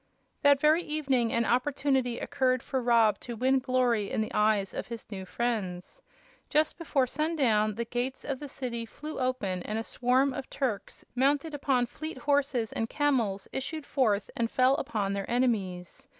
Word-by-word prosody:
That 285 -2 +5
very 310 +3 +4
evening 275 -7 0
an 235 0 +1
opportunity 260 -1 +1
occurred 255 -2 0
for 265 -1 -2
Rob 230 -4 +4
to 240 - -7
win 260 +3 +2
glory 250 -5 +1
in - - -2
the 215 - -2
eyes 210 -2 +2
of - - -4
his 230 -2 -8
new 190 -2 -5
friends. 210 - -3 0.5
Just 305 0 +2
before 285 -5 +1
sundown 255 -8 +1
the 235 +2 -2
gates 245 +3 -3
of 275 -3 -3
the 290 - -6
city 250 -4 -4
flew 300 +7 -7
open 250 -8 -1
and 215 +4 -3
a 225 - -2
swarm 255 +4 +2
of 270 0 -6
Turks, 245 -8 -3
mounted 285 +4 +1
upon 270 -3 +1
fleet 310 +5 -7
horses 270 -4 +1
and 225 0 -2
camels, 235 -10 0
issued 295 +3 -4
forth 215 -7 +1
and 230 -1 0
fell 255 +2 +4
upon 210 -10 -2
their 200 -1 -3
enemies. 205 -8 -1
250 Hz, 170 wpm, -29 LUFS, 220-275 Hz, 0.5 s, That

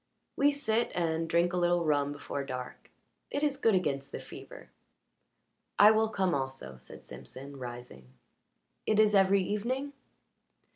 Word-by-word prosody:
"We 285 +1 +4
sit 235 -5 0
and 165 -1 0
drink 170 +2 +2
a - - 0
little 175 -1 +2
rum 145 -2 +2
before 145 -1 -5
dark; 125 -2 -7 0.4
it 285 - -2
is 290 -2 +2
good 225 -6 +3
against 140 -6 -1
the - - -5
fever." - - -11 1.1
"I 210 +1 +9
will 220 0 +2
come 190 -4 0
also," 130 - -4
said 65 - -12
Simpson, 140 +2 -9
rising. 120 - -9 0.8
"It 215 -1 +3
is 215 -1 +5
every 195 0 +4
evening?" 255 +9 -2
175 Hz, 145 wpm, -30 LUFS, 140-215 Hz, 1.1 s, I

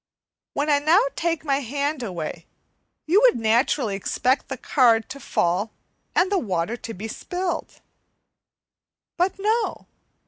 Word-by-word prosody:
When 290 - 0
I 290 -1 +4
now 315 +6 +5 0.2
take 335 -2 -1
my 275 -2 +2
hand 285 +2 -2
away 175 -6 -5 0.6
you 370 +7 +4
would - - +6
naturally 225 0 +1
expect 250 +6 0
the 265 - -5
card 230 -4 +3
to 280 - -7
fall, 185 -2 0 0.5
and 370 - +3
the 395 - +3
water 190 - -1
to 225 -1 -7
be 210 +5 -6
spilt. 355 - -4 1.3
But 360 +2 0
no! 435 +4 0
275 Hz, 135 wpm, -24 LUFS, 225-340 Hz, 1.3 s, would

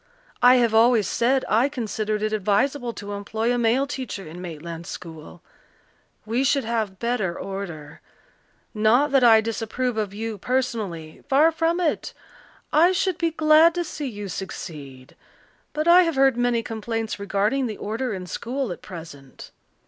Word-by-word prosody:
I 250 +1 +7
have 235 -3 +2
always 225 -1 +4
said 260 +3 +1
I 235 +6 +3
considered 215 -5 -3
it 215 0 -1
advisable 235 +6 0
to 205 -1 -8
employ 220 +4 -2
a 245 - 0
male 240 +4 +2
teacher 255 -8 -6
in 170 +3 -9
Maitland 170 0 -7
school. 160 0 -10 0.8
We 235 +4 0
should 275 0 +2
have 220 -4 -2
better 220 -6 -1
order. 170 -7 -7 0.7
Not 235 +7 +3
that 270 -2 +4
I 225 -2 +7
disapprove 230 +2 -3
of 210 -3 -1
you 220 0 -5
personally 210 -10 -3
far 300 +4 +5
from 330 +2 0
it. 335 -4 -1 0.6
I 345 +4 +5
should 370 -1 0
be 335 -1 +1
glad 315 +1 +5
to 350 - 0
see 305 -3 -5
you 205 -3 -7
succeed. 145 -8 -8 0.6
But 305 +2 -2
I 350 +2 +8
have 330 -4 0
heard 270 -2 +4
many 245 -1 +1
complaints 225 -1 -4
regarding 205 +6 0
the 215 - -6
order 230 +4 -3
in 185 -3 -5
school 245 +5 -4
at - - -7
present." 160 -8 -11
225 Hz, 155 wpm, -23 LUFS, 200-265 Hz, 0.8 s, I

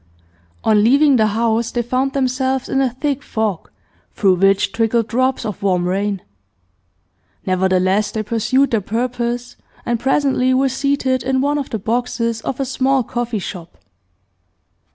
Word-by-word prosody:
On 210 -1 +3
leaving 275 +3 +5
the 220 -1 +3
house 225 +1 0
they 240 0 -2
found 255 +3 -1
themselves 260 0 0
in 270 - +1
a 265 - +2
thick 280 +3 -2
fog, 220 - -3 0.5
through 195 -3 +3
which 195 +1 +3
trickled 225 0 +1
drops 255 +2 0
of 210 -3 -5
warm 180 -3 +1
rain. 195 +1 -1 1.2
Nevertheless, 185 +2 +1
they 220 - -3
pursued 255 +5 +1
their 225 -3 +1
purpose, 240 +3 -3 0.3
and 235 -1 0
presently 265 -1 +2
were 270 +1 +2
seated 265 -1 0
in 265 0 0
one 290 +2 +1
of 280 - -5
the 225 - -2
boxes 230 +1 -2
of 255 - -4
a 270 - 0
small 265 0 +1
coffee 240 0 -3
shop. 175 -3 -7
240 Hz, 150 wpm, -18 LUFS, 215-265 Hz, 1.2 s, leaving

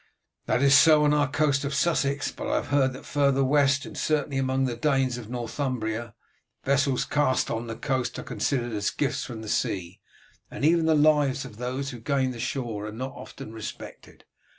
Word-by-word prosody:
"That 125 - +1
is 140 0 +6
so 155 +1 +7
on 150 0 +4
our 145 -2 +2
coast 140 0 +1
of 140 0 -2
Sussex, 140 -2 +1
but - - -6
I - - 0
have - - -2
heard 135 -2 +2
that 130 - -10
further 140 -1 +2
west, 140 0 +3
and - - -9
certainly 145 -3 0
among 130 0 +1
the 120 -2 -2
Danes 130 -1 +1
of 110 -2 -10
Northumbria, 120 -2 -3 0.5
vessels 140 -1 +1
cast 145 -3 +1
on 115 +1 -3
the 115 - -5
coast 130 +1 -2
are - - -5
considered 120 -4 -2
as 105 -1 0
gifts 145 - -2
from 110 -3 -7
the - - -8
sea, 95 -1 -2 0.5
and - - -3
even 165 0 +3
the 160 - +4
lives 145 -3 +3
of 115 -5 -11
those 130 +3 -3
who 120 - -8
gain 130 +2 0
the 120 - -8
shore 115 -4 -3
are - - -6
not 130 +5 -5
often 135 -4 -10
respected. 110 -2 -9
135 Hz, 200 wpm, -26 LUFS, 120-140 Hz, 0.5 s, so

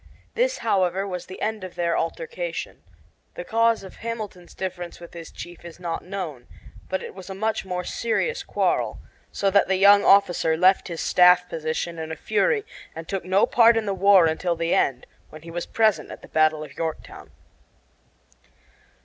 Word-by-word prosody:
This, - - +1
however, 190 -2 +1
was 180 -2 -6
the 185 - -9
end 215 -2 -2
of 185 - -8
their 170 -1 0
altercation 480 - -4 0.5
The - - -5
cause 230 -1 +2
of 190 - -12
Hamilton's 215 -6 -7
difference 180 -2 -6
with 170 -1 -12
his 165 -2 -9
chief 175 -1 -10
is 170 0 -11
not 170 -2 -4
known, 170 -10 -6 0.4
but 190 - -2
it - - -8
was 190 0 -11
a 190 - -6
much 220 0 -2
more 180 -1 -3
serious 475 - -1
quarrel; - - -1 0.3
so 195 -1 0
that 200 +1 +4
the 190 - +2
young 200 +2 +6
officer 175 -5 +4
left 185 +3 +4
his 170 -3 -5
staff 180 0 +5
position 160 +1 -4
in 160 0 -5
a - - -3
fury 415 - 0 0.3
and 165 0 -8
took 195 -2 -3
no 190 +3 +3
part 230 -1 +5
in 225 - -1
the 200 - -1
war 195 -2 +5
until 170 +2 0
the 165 +1 -1
end, 130 -2 +1 0.2
when 155 0 -12
he 165 - -9
was 175 0 -4
present 220 -2 +1
at - - -10
the - - -11
battle 155 -1 +2
of 145 -3 -11
Yorktown. 160 -1 -6
185 Hz, 185 wpm, -24 LUFS, 170-205 Hz, 0.5 s, young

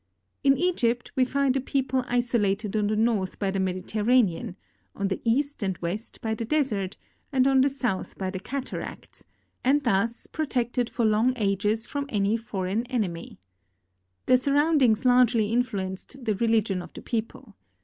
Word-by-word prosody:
In 275 -1 +5
Egypt 245 -10 0
we 260 - +4
find 275 0 +1
a 270 - +1
people 265 0 0
iso 245 -1 +1
lated 205 +1 -1
on 210 -1 +2
the 215 - 0
north 215 -4 0
by 195 -2 -1
the 195 - -2
Mediterranean, 190 0 +1 0.4
on 200 -1 -1
the 190 - -3
east 280 +5 0
and 190 -3 -1
west 185 +7 -5
by 220 -1 -1
the 220 - -3
Desert, 220 -8 -1 0.3
and 260 -2 +3
on 270 -1 +5
the 275 - +4
south 245 -8 -3
by 190 -1 -3
the 190 - -4
Cataracts, 265 +7 -6 0.4
and 285 +3 +3
thus 230 0 0
pro 315 -2 -3
tected 245 -2 0
for 235 - 0
long 220 +4 +3
ages 210 0 0
from 285 0 -4
any 205 -1 +1
foreign 205 -1 -2
enemy. 200 -10 -3 0.9
Their 255 - +5
surround 290 +4 +2
ings 230 -1 +3
largely 245 -3 +4
influenced 235 +1 -3
the 215 - +2
religion 215 -3 +1
of - - -10
the - - -10
people. 220 -3 -4
230 Hz, 170 wpm, -26 LUFS, 200-255 Hz, 0.9 s, In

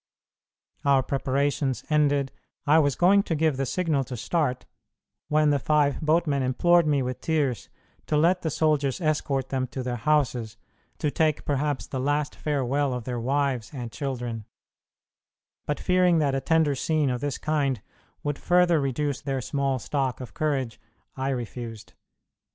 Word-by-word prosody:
Our 140 -2 +4
preparations 135 -1 -1
ended, 145 -3 +2 0.3
I 155 +2 +5
was 145 -3 +2
going 195 +3 +5
to 165 - -2
give 155 -3 +1
the 135 0 -1
signal 160 -5 0
to 125 -1 -6
start, 130 -1 -1 0.6
when 150 0 +3
the 145 - +2
five 145 +1 +2
boatmen 155 -2 +2
implored 170 +6 +3
me 145 -3 +2
with 125 0 -4
tears 145 -8 -1 0.4
to 150 - +1
let 175 +4 +3
the 160 - -1
soldiers 150 -2 +1
escort 145 -5 -1
them 130 -1 -1
to 130 +1 -5
their 125 -1 -3
houses, 125 -6 0 0.4
to 150 - -1
take 155 -1 +1
perhaps 145 0 -1
the 130 - -5
last 145 +2 0
farewell 140 -2 0
of 125 - -5
their 125 0 -3
wives 130 -2 0
and 120 -3 -5
children; 120 -5 -4 1.2
but, 145 - -1
fearing 180 -2 +3
that 145 -3 +1
a 135 - 0
tender 160 -2 +2
scene 150 0 0
of 125 -1 -3
this 145 -1 -2
kind 140 -5 0 0.4
would 145 -1 -2
further 175 -3 +3
reduce 140 +1 -1
their 135 -2 -2
small 135 +1 -1
stock 135 +1 -2
of 125 - -8
courage, 135 -7 -2 0.3
I 135 0 -2
refused. 120 -3 -5
140 Hz, 155 wpm, -26 LUFS, 130-155 Hz, 1.2 s, I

